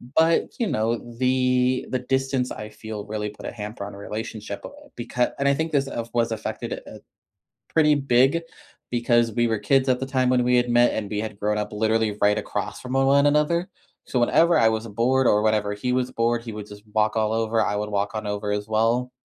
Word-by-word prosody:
But, 165 +1 +3
you 230 - +1
know, 115 -2 0 0.2
the 125 0 +2
the 130 - -1
distance 130 0 -1
I 105 0 -6
feel 110 -1 -7
really 105 0 -3
put 105 - -12
a - - -4
hamper 105 -2 -6
on 100 - -8
our 100 - -10
relationship, 105 -1 -6
bu - - -7 0.3
becau 120 +1 -1
and 140 - +1
I 140 - +4
think 160 +3 -2
this 135 -2 +1
of 115 -3 -5
was 115 -1 +1
affected, 110 -1 -4
uh, - - -10 0.7
pretty 150 -2 +4
big, 135 +3 +3 0.5
because 120 -1 +2
we 120 0 +2
were 110 -2 0
kids 130 +5 +2
at 125 - +2
the 135 - -1
time 130 -2 +1
when 125 -1 +3
we 125 0 +3
had 120 0 +1
met, 120 0 +4
and 105 -2 -3
we 105 - -2
had 105 -1 -5
grown 105 +1 0
up 105 - -3
literally 110 0 +1
right 105 0 +4
across - - -4
from 130 +1 -5
a 135 0 +3
one 140 +1 +4
another. 150 +4 +2 0.4
So, 125 - 0
whenever 165 +7 +4
I 110 - +5
was 110 +1 -2
bored, 125 +5 +1
or 105 - +4
whatever 105 -1 +1
he 125 +5 -2
was 125 0 0
bored, 115 0 0
he 115 - -6
would 105 -1 -7
just 105 0 -12
walk 110 0 +2
all 110 -1 +1
over, 115 0 +1
I 105 - -1
would 105 +1 -2
walk 100 0 -1
on 110 -1 -3
over 105 0 -2
as 105 +1 -2
well, 115 +3 +1
115 Hz, 230 wpm, -24 LUFS, 105-130 Hz, 0.7 s, I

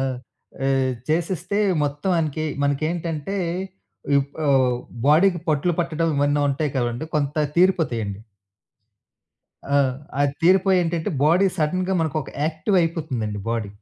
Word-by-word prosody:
ఆ! - - +1 0.6
ఆహ్, 135 -1 +2 0.2
చేసేస్తే 175 +5 -1 0.2
మొత్తం 145 +5 -1
అనికి 155 0 -2 0.2
మనకేంటంటే 155 +4 -1 0.8
ఇప్ 140 0 -3 0.2
ఆహ్, 130 -3 +3 0.3
బాడీ‌కి 175 +4 +4
పట్లు 155 +3 +2
పట్టడం 165 -1 -1
ఇవన్నీ 145 +1 +2
ఉంటాయి 140 +1 -1
కదండీ! 120 +4 -2
కొంత 145 -1 -1 0.2
తీరిపోతాయండి. 120 - +1 1.5
ఆ! - - +1 0.5
అది 145 -1 +2
తీరిపోయేంటంటే, 180 -2 +3
బాడీ 170 +6 +4
సడెన్‌గా 185 +4 0
మనకొక 155 -2 -2
యాక్టివ్ 160 +6 0
అయిపోతుందండి 140 - -2
బాడీ. 115 -3 -2
155 Hz, 110 wpm, -23 LUFS, 140-170 Hz, 1.5 s, బాడీ‌కి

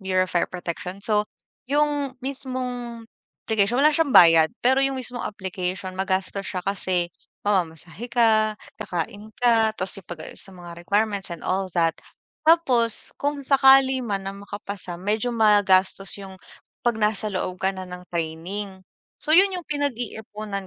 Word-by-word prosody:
Bureau 185 -1 +1
of 185 - -10
Fire 175 - +1
Protection. 180 +1 -5
So, 210 -1 +1 0.4
yung 290 -2 0
mismong 250 -3 -4 0.4
application 220 +1 +2
wala 300 +3 +5
siyang 295 -3 +1
bayad. 165 -2 +8 0.2
Pero 265 +2 +4
yung 270 -1 +1
mismong 245 -1 -5
application 185 -1 -4
magastos 190 +1 -2
siya 180 -1 -4
kasi 185 -3 -1 0.3
mamamasahe 180 +2 -2
ka, 220 -3 +3 0.2
kakain 205 +2 -4
ka. 225 -3 +3
Tas 185 +1 -3
'yong 185 - -30
pag-aayos 160 -3 -8
sa 195 - -12
mga 175 -1 -10
requirements 200 +2 0
and 170 -2 -8
all 190 0 0
that. 165 -1 +3 0.5
Tapos 260 -9 +2
kung 285 -1 -2
sakali 265 -1 +6
man 200 -5 -3
na 195 - -3
makapasa 200 -2 -7
medyo 210 +6 -1
magastos 205 -4 +3
'yong 190 -2 -10 0.4
'pag 240 -2 +1
nasa 210 -1 +1
loob 185 -2 -4
ka 190 - +2
na 185 - -5
ng 180 0 -10
training. 180 +4 -4 0.4
So, 305 - -3
yun 380 +3 +6
yung 355 - -4
pinag-iipunan 220 -8 -4
205 Hz, 150 wpm, -24 LUFS, 185-245 Hz, 0.5 s, bayad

